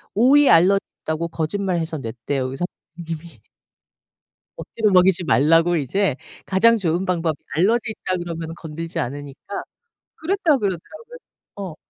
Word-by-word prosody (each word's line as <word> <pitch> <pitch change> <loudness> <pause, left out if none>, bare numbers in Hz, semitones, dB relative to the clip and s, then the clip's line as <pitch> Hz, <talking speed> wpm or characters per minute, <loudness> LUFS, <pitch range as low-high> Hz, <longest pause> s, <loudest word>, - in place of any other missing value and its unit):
'오이 270 +6 +5
알러지 185 +4 +6 0.2
있다.'고 160 +2 -2
거짓말해서 165 -1 -2
냈대요 125 +3 -3
의사 135 +7 -3 0.3
선생님이. 165 -1 -7 1.2
억지로 215 -3 -1
먹이지 180 -1 +4
말라고 165 +6 +4
이제 160 +2 0 0.3
가장 230 +4 +4
좋은 175 -1 -1
방법 165 -4 0 0.2
"알러지 220 +6 +2
있다." 185 -3 -3
그러면은 165 -1 -5
건들지 165 +1 -6
않으니까 145 +7 -5 0.5
그랬다 340 -3 +1
그러더라고요. 310 - -5 0.4
어. 190 -5 -6
175 Hz, 330 characters per minute, -22 LUFS, 160-200 Hz, 1.2 s, 알러지